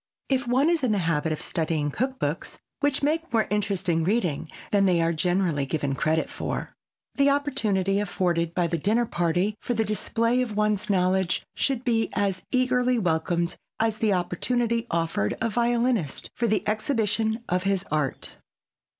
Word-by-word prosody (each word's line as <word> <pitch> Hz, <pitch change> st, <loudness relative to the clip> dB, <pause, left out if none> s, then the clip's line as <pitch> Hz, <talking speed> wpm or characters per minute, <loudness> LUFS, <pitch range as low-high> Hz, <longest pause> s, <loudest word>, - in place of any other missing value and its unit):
If 260 Hz, -2 st, +1 dB
one 260 Hz, +5 st, +3 dB
is 335 Hz, -3 st, +1 dB
in 250 Hz, -5 st, +2 dB
the -, -, +1 dB
habit 160 Hz, -1 st, 0 dB
of 155 Hz, -, -2 dB
studying 155 Hz, -3 st, -1 dB
cook 260 Hz, -, -2 dB
books, -, -, -3 dB, 0.2 s
which 285 Hz, -1 st, +1 dB
make 320 Hz, +3 st, 0 dB
more 225 Hz, -2 st, +2 dB
interesting 195 Hz, -5 st, 0 dB
reading 175 Hz, -6 st, 0 dB, 0.2 s
than 200 Hz, -1 st, +4 dB
they 180 Hz, -2 st, +3 dB
are 165 Hz, 0 st, +2 dB
generally 170 Hz, -4 st, +1 dB
given 145 Hz, -2 st, -1 dB
credit 155 Hz, +3 st, +1 dB
for, -, -, -4 dB, 0.4 s
the 280 Hz, 0 st, +3 dB
opportunity 215 Hz, -10 st, +1 dB
afforded 175 Hz, -4 st, 0 dB
by 180 Hz, -, +2 dB
a -, -, +1 dB
dinner 205 Hz, +9 st, +1 dB
party 175 Hz, +1 st, 0 dB
for 245 Hz, -, -2 dB
the 220 Hz, 0 st, +1 dB
display 230 Hz, +3 st, +1 dB
of 225 Hz, -5 st, -3 dB
one's 210 Hz, 0 st, +1 dB
knowledge 185 Hz, -1 st, +1 dB
should 265 Hz, -3 st, -1 dB
be 225 Hz, -2 st, +1 dB
as 195 Hz, -2 st, 0 dB
eagerly 250 Hz, -1 st, +2 dB
welcomed 170 Hz, -2 st, 0 dB, 0.2 s
as 220 Hz, -1 st, +1 dB
the 220 Hz, -1 st, +1 dB
opportunity 230 Hz, +6 st, 0 dB
offered 165 Hz, -11 st, 0 dB
a 230 Hz, 0 st, 0 dB
violinist 235 Hz, -, 0 dB
for 235 Hz, -, 0 dB
the 215 Hz, -1 st, 0 dB
exhibition 220 Hz, 0 st, 0 dB
of 180 Hz, +1 st, +1 dB
his 195 Hz, -1 st, 0 dB
art. 150 Hz, -3 st, -2 dB
205 Hz, 165 wpm, -26 LUFS, 170-235 Hz, 0.4 s, than